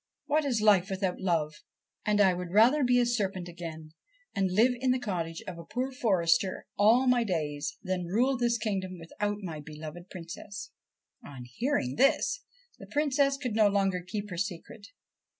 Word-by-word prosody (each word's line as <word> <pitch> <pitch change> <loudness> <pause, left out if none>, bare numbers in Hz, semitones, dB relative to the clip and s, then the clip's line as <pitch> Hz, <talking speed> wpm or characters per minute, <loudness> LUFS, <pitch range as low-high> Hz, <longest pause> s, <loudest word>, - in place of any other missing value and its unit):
What 305 +1 +1
is 240 -6 0
life 200 -2 +5
without 190 -1 -2
love? 165 -5 0 0.5
and 210 0 +3
I 190 -2 +5
would 180 0 -5
rather 235 - +5
be 245 0 +4
a 245 - +3
serpent 195 -7 -1
again, 165 -2 -8 0.4
and 195 -1 +1
live 225 +7 +4
in 260 0 0
the 255 - +3
cottage 170 -8 -4
of 175 -2 -7
a - - -8
poor 255 +7 -3
forester 185 -7 +1
all 230 +5 +5
my 250 -2 +4
days, 150 -6 -2
than 180 -2 -2
rule 245 +9 +2
this 240 -1 +1
kingdom 190 -4 -3
without 205 +5 -4
my 165 -4 -5
beloved 155 +4 -9
Princess.' 180 +4 -8 0.5
On 135 -3 -9
hearing 130 - -1
this - - +3 0.4
the - - -11
Princess 280 -2 +2
could 255 -5 -3
no 215 -1 +5
longer 195 -2 +1
keep 205 +3 -5
her 175 - -4
secret. 200 +3 -5
195 Hz, 170 wpm, -29 LUFS, 175-240 Hz, 0.5 s, life